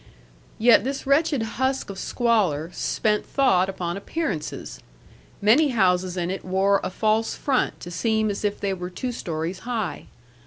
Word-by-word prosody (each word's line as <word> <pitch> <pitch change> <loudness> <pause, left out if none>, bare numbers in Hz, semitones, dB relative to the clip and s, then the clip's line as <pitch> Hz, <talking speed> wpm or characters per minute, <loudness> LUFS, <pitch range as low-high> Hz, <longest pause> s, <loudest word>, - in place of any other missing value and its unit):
Yet 230 +1 +6
this 270 +2 -3
wretched 280 -2 +2 0.2
husk 260 -5 0
of 195 - -8
squalor 190 - +1
spent 210 -1 0
thought 190 -9 +2
upon 175 -2 -3
appearances; 200 - -4 0.6
many 250 +9 +5
houses 185 -6 +1
in 175 0 -1
it 190 - -5
wore 195 +2 +2
a - - -1
false 220 +3 0
front 270 -3 0
to 175 - -7
seem 220 +4 +1
as 200 - -5
if 205 -1 -1
they 200 -1 -1
were 180 -1 -5
two 245 +8 -4
stories 170 -4 -4
high. 220 -7 -4
205 Hz, 155 wpm, -24 LUFS, 180-240 Hz, 0.6 s, Yet